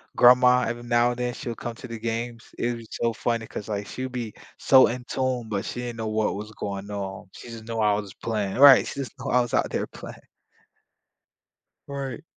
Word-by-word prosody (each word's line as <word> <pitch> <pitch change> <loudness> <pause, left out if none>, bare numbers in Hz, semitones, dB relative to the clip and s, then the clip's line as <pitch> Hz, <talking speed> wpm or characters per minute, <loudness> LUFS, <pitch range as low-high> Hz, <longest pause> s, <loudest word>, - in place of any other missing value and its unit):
grandma, 125 0 +6
every 120 +1 -4
now 120 0 +3
and 120 - -6
then 125 0 -1
she'll 120 -2 -5
come 120 -1 -6
to 125 - -10
the 115 -1 -7
games. 115 0 -3
It 120 0 -1
was 115 -1 -10
so 115 -1 -1
funny 115 0 -2
'cause, 105 - -7
like, 100 -1 -3
she'd 130 0 -5
be 120 -4 -4 0.2
so 130 -1 +6
in 125 +1 -4
tune, 130 -3 -1
but 100 -3 -2
she 120 - -5
didn't 120 -1 -5
know 110 -1 -3
what 110 -1 0
was 105 +1 -7
going 100 -1 -5
on. 95 -2 -5
She 120 - -11
just 115 -1 -9
knew 115 0 -4
I 105 -1 +3
was 100 -2 -3
playing 105 -2 -2
right, 140 -1 +9
she - - -6
just 135 - -5
knew 130 - -4
I 125 0 +5
was 120 - -4
out - - +2
there - - -2
playing. - - -10 1.7
Right. 135 -3 -5
115 Hz, 220 wpm, -25 LUFS, 110-125 Hz, 1.7 s, right